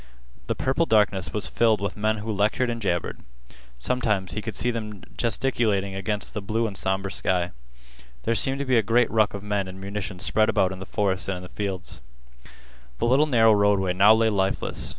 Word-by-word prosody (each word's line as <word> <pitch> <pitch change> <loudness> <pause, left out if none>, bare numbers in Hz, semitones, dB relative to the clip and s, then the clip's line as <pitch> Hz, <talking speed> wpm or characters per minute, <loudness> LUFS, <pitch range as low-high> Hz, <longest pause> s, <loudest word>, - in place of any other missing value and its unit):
The - - -1
purple 135 +6 0
darkness 105 -3 +2
was 105 0 -2
filled 110 -3 +2
with 100 -1 -3
men 110 +1 0
who 110 +1 -4
lectured 110 +4 +1
and 115 -1 -5
jabbered. 85 -5 -2 0.6
Sometimes 100 - 0
he 105 - -4
could 110 0 -6
see 125 - 0
them 105 -3 -6
gesticulating 110 -5 0
against 100 +2 -3
the 105 - -4
blue 110 +4 -1
and 105 -3 -4
somber 95 0 -1
sky. 90 -2 -1 0.7
There 115 - +1
seemed 135 +4 +1
to 140 - -3
be 130 -3 +3
a - - +3
great 115 +3 +2
ruck 110 -2 +2
of 100 - -7
men 105 -2 -1
and 95 +1 -9
munitions 100 -1 -5
spread 110 0 +2
about 95 - +2
in 95 - -7
the 95 - -8
forest 100 -2 -1
and 95 -1 -2
in 90 - -9
the 90 - -10
fields. 95 -10 -5 1.0
The - - -1
little 135 +6 +4
narrow 115 -5 +5
roadway 100 -3 +2
now 100 +4 +6
lay 110 0 +2
lifeless. 95 -1 -1
105 Hz, 200 wpm, -25 LUFS, 95-115 Hz, 1.0 s, now